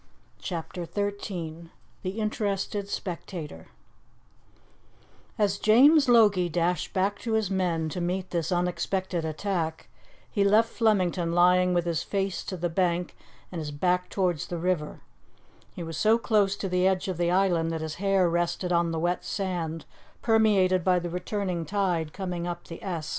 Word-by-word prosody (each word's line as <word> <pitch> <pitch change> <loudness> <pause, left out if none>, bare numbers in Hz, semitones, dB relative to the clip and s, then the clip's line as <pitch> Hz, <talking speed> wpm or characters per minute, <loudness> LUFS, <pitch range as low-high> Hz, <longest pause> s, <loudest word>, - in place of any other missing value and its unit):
CHAPTER 175 0 -5
XIII 180 -5 -4 0.3
THE 190 +4 -4
INTERESTED 205 -1 -2
SPECTATOR 170 - -6 1.7
AS 200 -2 +1
James 275 +6 +6
Logie 205 -7 +5
dashed 175 0 0
back 200 +1 0
to 230 - -3
his 220 -3 +1
men 175 -4 0
to 175 - -4
meet 180 +2 -2
this 170 0 -1
unexpected 180 0 -1
attack, 160 0 -3 0.4
he 200 - +2
left 215 +3 +4
Flemington 185 -7 +1
lying 180 +1 +4
with 175 -1 +1
his 165 -2 0
face 195 0 -2
to 185 - -4
the 175 +1 -1
bank 175 0 0 0.4
and 175 - -4
his 155 -2 -4
back 180 +5 0
towards 180 -6 -1
the 175 - -4
river; 170 -3 -2 0.7
he 175 - -5
was 165 -1 -6
so 220 +6 +4
close 210 -4 +2
to 200 - -4
the 180 0 +2
edge 190 0 0
of 185 -3 -3
the 170 0 +1
island 175 -3 +2
that 165 -1 -3
his 160 -1 -4
hair 195 -2 +3
rested 175 +1 -1
on 170 0 +2
the 165 - -2
wet 175 +2 0
sand 170 -5 -3 0.4
permeated 200 -5 +3
by 185 0 +3
the 175 -1 -3
returning 180 -1 -2
tide 175 -4 -1
coming 180 -2 -4
up 175 0 -5
the 165 - -10
Esk. 170 -6 -4
180 Hz, 160 wpm, -27 LUFS, 170-200 Hz, 1.7 s, James